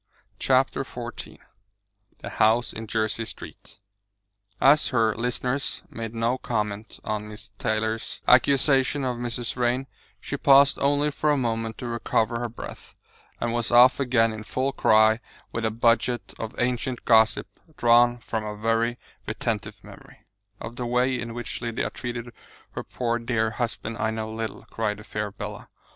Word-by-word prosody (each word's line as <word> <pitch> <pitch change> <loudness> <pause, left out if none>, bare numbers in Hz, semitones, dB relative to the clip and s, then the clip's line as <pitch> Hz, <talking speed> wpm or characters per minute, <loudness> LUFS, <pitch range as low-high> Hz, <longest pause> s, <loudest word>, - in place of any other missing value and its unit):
CHAPTER - - +2
XIV - - -8 0.9
THE - - -4
HOUSE 115 +3 +2
IN 110 0 -7
JERSEY 110 +1 -1
STREET - - -10 0.8
As 145 +3 +5
her 115 -4 +2
listeners 125 +3 -2
made 115 0 -6
no 115 +3 0
comment 105 -2 -3
on 105 0 -3
Miss 105 0 -11
Tyler's 110 0 -2
accusation 135 +1 +4
of 125 -2 -1
Mrs. 120 0 -3
Vrain, 125 +1 0 0.3
she - - -4
paused 140 0 +6
only 145 +1 +2
for 150 +1 0
a 145 - +3
moment 115 -3 -2
to 125 - -5
recover 115 0 0
her 120 0 -3
breath, 115 - -10 0.4
and 120 0 -1
was 120 -2 0
off 120 +2 +7
again 120 -4 +3
in 110 - -7
full 130 +5 -1
cry 110 -2 +4 0.3
with 115 0 -2
a - - +2
budget 115 +2 +1
of 110 -1 -5
ancient 125 0 -1
gossip 110 -1 +4 0.3
drawn 120 0 +5
from 115 -2 -4
a 105 -1 -5
very 115 +2 +1 0.3
retentive - - -3
memory. - - -15 0.3
"Of 120 +2 -8
the 125 - -3
way 125 +2 +2
in 120 -2 -4
which 120 -1 -5
Lydia 115 0 -2
treated 120 -1 -6 0.4
her - - -5
poor 120 -1 -2
dear 115 -2 0
husband 115 -1 -3
I 110 - +1
know 110 0 -4
little," 110 -1 -5
cried 105 -2 -1
the 105 - -11
fair 105 0 -3
Bella. 100 - -8
115 Hz, 155 wpm, -25 LUFS, 110-125 Hz, 0.9 s, off